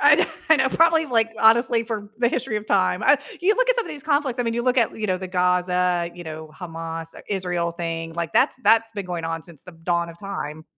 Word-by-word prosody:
I - - +7
kno - - +2 0.2
I 320 - +7
know. 265 -1 +2
Probably, 325 +1 +3
like, 225 -3 +2
honestly, 230 +1 +4
for 220 -3 -5
the 240 -1 +3
history 245 -3 -2
of 210 - -5
time. 185 -3 +1
Uh, - - +6 0.2
you 400 +5 +3
look - - +2
at - - +5
some 475 -2 0
of - - -8
these 290 -2 -4
conflicts. 285 -5 0
I 245 - 0
mean, 230 0 -1
you 240 - -1
look 255 0 +2
at, 230 - +1
you 215 - -2
know, 185 -1 0
the 185 - -5
Gaza, 180 -1 +1
you 175 - -9
know, 155 0 -7
Hamas-Israel 170 +1 -4
thing. 165 -1 -4
Like, 170 -1 -3
that's - - +3
that's 225 +1 +4
been 200 -3 -5
going 175 -2 -4
on 165 0 -3
since 165 -4 -14
the 180 - -11
dawn 170 +1 -1
of 170 0 -12
time. 155 -6 -6
185 Hz, 245 wpm, -23 LUFS, 170-235 Hz, 0.2 s, I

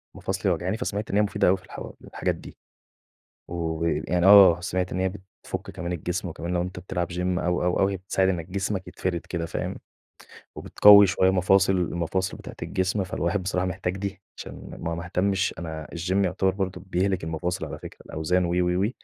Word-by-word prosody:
ومفاصلي 95 0 -1
واجعاني، 90 +5 -1
فسمعت 105 -4 -3
إن - - -1
هي 105 - +5
مفيدة 105 - +1
أوي 95 +2 +4
في 90 - -18
الحو - - -8
الحاجات - - -2
دي. - - -12 0.9
وي 80 -2 -1
يعني 90 0 +1
آه، 95 -4 +9
سمعت 90 +1 -2
إن 90 - -2
هي 95 - +1
بتفك 95 0 -8
كمان 85 -1 -5
الجسم 90 +2 -3
وكمان 85 +2 -5
لو 85 - +1
أنت 90 +1 -5
بتلعب 90 -1 -3
gym 90 - -4 0.2
أو، 90 0 0
أو، 90 0 +1
أو 95 - +4
هي 100 0 -2
بتساعد 95 +1 +1
إن 85 -4 -2
جسمك 95 0 -2
يتفرد 85 -2 -3
كده 85 -2 -3
فاهم؟ 85 - -4 0.8
وبتقوي 100 -1 +7
شوية 95 +1 +3
مفاصل 95 +1 +3
المفاصل 90 +1 -1
بتاعة - - -10
الجسم، 95 +2 -1
فالواحد 90 +1 -1
بصراحة 90 0 0
محتاج 90 0 -3
دي 95 -1 -5 0.2
عشان - - -9
ما 85 0 -3
ما 85 +1 -6
اهتمش 95 +2 0
أنا 80 -2 -6
الgym 95 +4 +1
يُعتبر 95 +1 +1
برضه 95 -2 -3
بيهلك 95 0 0
المفاصل 80 +3 -3
على - - -6
فكرة، - - -11
الأوزان 90 +4 0
و، - - -2
و، 90 +1 +1
و - - +1
90 Hz, 190 wpm, -25 LUFS, 85-95 Hz, 0.9 s, آه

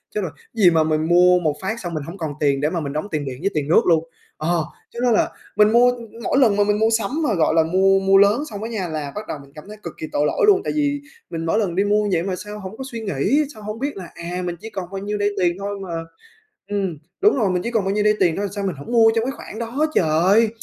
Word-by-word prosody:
"Chết 210 - 0
rồi! 170 -5 -3 0.2
Gì 205 -6 +5
mà 160 -1 +3
mình 155 0 0
mua 180 +1 +5
một 155 -4 0
phát 220 +5 -3
xong 175 -5 -5
mình 155 -3 -3
hông 170 +6 -8
còn 155 -3 -4
tiền 140 -2 +1
để 150 - +2
mà 175 0 -2
mình 140 -3 -4
đóng 155 +6 -3
tiền 150 -3 -2
điện 130 -2 -5
với 195 - +1
tiền 150 -2 -1
nước 165 - +5
luôn." 165 -2 +3 0.3
Ờ, 155 - -4 0.4
cho 235 - -9
nên 240 -2 +4
là - - +2 0.3
mình 210 0 +5
mua 245 +1 +5 0.3
mỗi - - +1
lần 230 -7 +4
mà 205 - +3
mình 210 0 +1
mua 220 +1 +3
sắm 205 -3 -3
mà 245 - +1
gọi 160 -3 +2
là 160 - +5
mua 190 +3 +3
mua 195 0 +4
lớn 205 +7 +4
xong 210 0 -6
á 225 - -4
nha, 205 -6 -3
là 155 -3 -4
bắt 210 +1 -6
đầu - - -4
mình 140 0 -17
cảm 150 +5 -11
thấy 210 0 -10
cực 170 - -6
kỳ 155 - -5
tội 145 - +1
lỗi - - 0
luôn. 395 -2 +5
Tại - - -2
vì 290 -1 0 0.3
mình 165 0 -4
mỗi 210 +7 +1
lần 185 -5 -1
đi 195 - +3
mua 210 +1 +2
vậy 170 -2 +1
mà 185 -1 -2
sao 210 +2 -8
hổng 195 +2 -8
có 265 - -5
suy 230 -1 -5
nghĩ, 205 - +1
sao 215 - -13
hông 215 +2 -5
biết 280 -1 -3
là 180 -3 -8
"À, 175 +2 -5
mình 175 - -3
chỉ 225 - -8
còn 190 -5 -6
bao 195 - -5
nhiêu 210 +1 -3
đây 205 0 +1
tiền 175 -2 +2
thôi 200 0 -4
mà" 190 -2 -7 0.8
ừm, 195 -5 -2 0.2
đúng 410 -6 +4
rồi, 210 -4 +2
"Mình 180 -1 0
chỉ 235 - -3
còn 220 -4 +1
bao 195 - 0
nhiêu 210 0 +1
đây 210 0 +4
tiền 165 -2 +3
thôi, 205 - -1
sao 200 - -3
mình 190 -4 -2
hổng 140 +9 -9
mua 225 -2 +6
trong 225 - +1
cái 265 - -1
khoản 220 - -9
đó 240 +7 -1
trời, 180 +8 +4
195 Hz, 300 wpm, -21 LUFS, 165-215 Hz, 0.8 s, mua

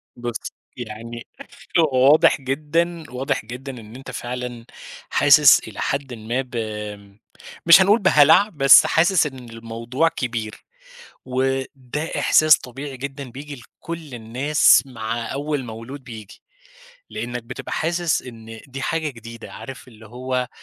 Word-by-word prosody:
بُصّ 120 -1 -5 0.3
يعني 115 0 -8 0.6
هو 135 -4 +4
واضح 150 -2 +4
جدًا، 155 +5 -1
واضح 125 -3 -2
جدًا 125 +4 -7
إن 110 +1 -13
أنت 135 - -9
فعلًا 120 -1 -6 0.4
حاسس - - +6
إلى - - -10
حدٍ 140 -2 -2
ما 115 +3 -3
ب 125 -1 -11
آمم، 105 -2 -6 0.5
مش 165 +2 +9
هنقول 205 +4 +4
بهلع 185 +2 +5
بس 135 -6 +7
حاسس 170 0 +3
إن 130 -4 -11
الموضوع 115 +6 -2
كبير، 115 -8 -5 0.6
وده 135 +2 -3
إحساس 155 -2 +5
طبيعي 135 +2 -8
جدًا 135 0 -7
بييجي 145 +4 -9
لكل 155 +3 -9
الناس 125 +7 +3
مع 115 -2 -5
أول 145 -1 -3
مولود 115 +5 -9
بييجي، 110 -4 -11 0.7
لأنك 120 0 -5
بتبقى 120 +2 -8
حاسس 170 0 0
إن 115 -2 -11
دي 135 0 -7
حاجة 160 0 -1
جديدة، 115 -2 -11
عارف 130 -1 -10
اللي 110 -2 -15
هو 125 +2 -3
130 Hz, 130 wpm, -21 LUFS, 115-145 Hz, 0.7 s, مش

